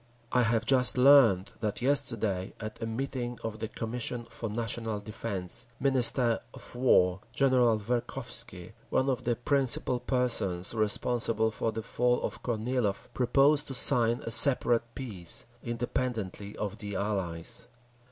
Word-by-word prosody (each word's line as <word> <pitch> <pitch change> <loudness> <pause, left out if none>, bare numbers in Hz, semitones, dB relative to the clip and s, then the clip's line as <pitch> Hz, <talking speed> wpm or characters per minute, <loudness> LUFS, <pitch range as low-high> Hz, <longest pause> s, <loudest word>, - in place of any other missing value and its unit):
I 125 - +3
have 115 -1 +1
just 130 -1 +4
learned 125 -8 +5
that 105 -2 -2
yesterday, 115 -8 0
at 110 0 -7
a 115 - -2
meeting 120 0 -4
of 110 -1 -5
the 110 - -3
Commission 120 +2 -4
for 115 -1 -5
National 115 0 -2
Defence, 100 0 -1
Minister 125 -3 +3 0.2
of - - -7
War 95 -8 +3 0.2
General 125 -4 +3
Verkhovsky, 115 +3 -4 0.2
one 135 +1 +1
of 125 -1 -4
the 120 0 +1
principal 130 -1 +1
persons 115 -9 0
responsible 110 +1 +1
for 110 - 0
the 110 0 -5
fall 125 +2 +1
of - - -4
Kornilov, 115 -3 -2
proposed 140 +4 +2
to 135 - -5
sign 120 -2 +2
a 115 - -4
separate 120 -2 +3
peace, 100 -10 -2 0.2
independently 115 -4 -4
of 105 +1 -4
the 100 -2 -6
Allies. 95 -5 -2
115 Hz, 135 wpm, -29 LUFS, 105-125 Hz, 0.2 s, learned